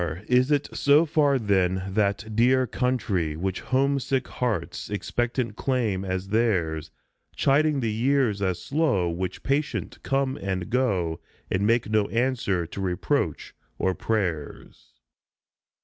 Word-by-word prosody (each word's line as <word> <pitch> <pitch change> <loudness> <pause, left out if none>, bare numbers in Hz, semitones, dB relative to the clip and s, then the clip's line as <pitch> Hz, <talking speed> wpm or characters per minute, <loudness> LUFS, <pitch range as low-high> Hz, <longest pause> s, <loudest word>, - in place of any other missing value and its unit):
Is 125 +2 +3
it 145 -1 +2
so 145 +3 +5
far 145 -3 +3
then, 95 -5 +1
that 105 +2 -1
dear 130 +3 +4
country 110 -11 -1
Which 95 +3 -3
homesick 135 0 0
hearts 115 -9 -3
expectant 120 +3 -2
claim 115 -8 0
as 95 0 -3
theirs, 85 -9 0 0.5
Chiding 145 0 +2
the 115 -2 0
years 120 -3 +1
as 95 -3 0
slow 135 - +1
which 90 +2 -4
patient 140 +2 -1
come 135 0 0
and 95 +1 -3
go, 95 -10 0 0.3
And 100 +2 +1
make 115 +1 +2
no 105 -1 +2
answer 115 -7 0
to 90 +4 -7
reproach 90 -2 -1 0.2
or 95 - +1
prayers 90 -9 -4
110 Hz, 125 wpm, -25 LUFS, 95-130 Hz, 0.5 s, so